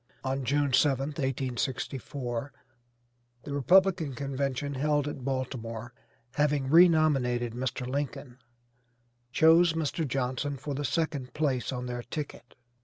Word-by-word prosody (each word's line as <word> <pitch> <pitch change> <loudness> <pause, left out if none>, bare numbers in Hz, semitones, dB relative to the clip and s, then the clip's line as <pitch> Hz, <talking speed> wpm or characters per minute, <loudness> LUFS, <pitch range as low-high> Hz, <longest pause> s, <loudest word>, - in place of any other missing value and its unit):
On 135 0 -2
June 145 +2 +1
7th, 140 +2 +2
1864, 130 0 -3 0.9
the 145 - -6
Republican 170 0 +3
convention 140 0 -2
held 145 +1 +1
at 140 -3 -6
Baltimore, 120 -3 -4 0.4
having 145 -2 +1
re 175 +3 +8
nominated 125 -7 +1
Mr. 125 +1 -3
Lincoln, 130 -1 -4 0.9
chose 165 +3 +5
Mr. 160 0 -1
Johnson 135 +2 -2
for 145 +2 -5
the 145 +2 -3
second 145 -3 -2
place 140 -5 0
on 125 -1 -4
their 120 0 -4
ticket. 125 -1 -7
135 Hz, 115 wpm, -29 LUFS, 125-150 Hz, 0.9 s, re